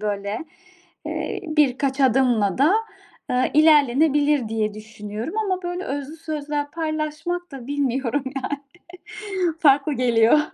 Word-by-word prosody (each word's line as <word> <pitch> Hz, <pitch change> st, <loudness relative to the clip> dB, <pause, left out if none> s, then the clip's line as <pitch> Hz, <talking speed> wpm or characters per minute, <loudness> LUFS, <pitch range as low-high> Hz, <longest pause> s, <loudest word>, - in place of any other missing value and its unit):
böyle, 205 Hz, 0 st, -2 dB, 0.7 s
eee, -, -, -3 dB
birkaç 280 Hz, -2 st, +1 dB
adımla 245 Hz, -6 st, +3 dB
da, 305 Hz, +9 st, +5 dB, 0.6 s
ııı, 250 Hz, +1 st, +2 dB
ilerlenebilir 295 Hz, -3 st, +4 dB
diye 215 Hz, -2 st, -1 dB
düşünüyorum 215 Hz, -, -7 dB
ama 380 Hz, -4 st, -1 dB
böyle 355 Hz, +1 st, -4 dB
özlü 285 Hz, +3 st, -5 dB
sözler 295 Hz, -2 st, -4 dB
paylaşmak 315 Hz, +2 st, -3 dB
da 260 Hz, -3 st, -8 dB
bilmiyorum 275 Hz, -1 st, -1 dB
yani 280 Hz, +2 st, -3 dB, 1.0 s
farklı 285 Hz, 0 st, +4 dB
geliyor. 240 Hz, +1 st, +4 dB
280 Hz, 110 wpm, -23 LUFS, 240-305 Hz, 1.0 s, da